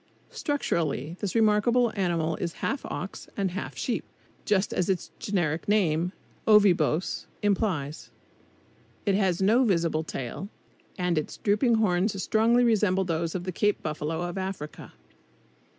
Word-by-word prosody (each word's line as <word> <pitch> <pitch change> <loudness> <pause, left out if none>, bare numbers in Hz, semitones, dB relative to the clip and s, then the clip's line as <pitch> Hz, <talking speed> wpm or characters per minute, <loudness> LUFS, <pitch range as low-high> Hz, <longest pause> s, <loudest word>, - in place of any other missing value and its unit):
Structurally 170 - -1
this 205 -1 -3
remarkable 225 +2 +3
animal 170 -5 0
is 170 -2 -3
half 270 - -1
ox 190 +2 -6
and 195 -3 0
half 190 +3 -5
sheep, - - -1 0.4
just 205 -1 +1
as 180 - 0
its 190 -2 -1
generic 175 -8 -1
name, 180 -4 +2 0.4
Ovibos, 185 -6 +3 0.2
implies. 185 -8 -1 1.0
It 200 - +3
has 190 -2 +1
no 230 +6 +5
visible 165 -7 +1
tail, 155 +6 -5 0.5
and 180 -3 +1
its 155 - -6
drooping 220 +3 +2
horns 195 -1 +1
strongly 230 +3 +3
resemble 210 -5 +3
those 165 -1 -2
of 180 - -2
the 185 - -3
Cape 205 +4 0
buffalo, 155 +2 -2
of 175 +2 -3
Africa. 185 -6 -6
190 Hz, 135 wpm, -27 LUFS, 165-210 Hz, 1.0 s, no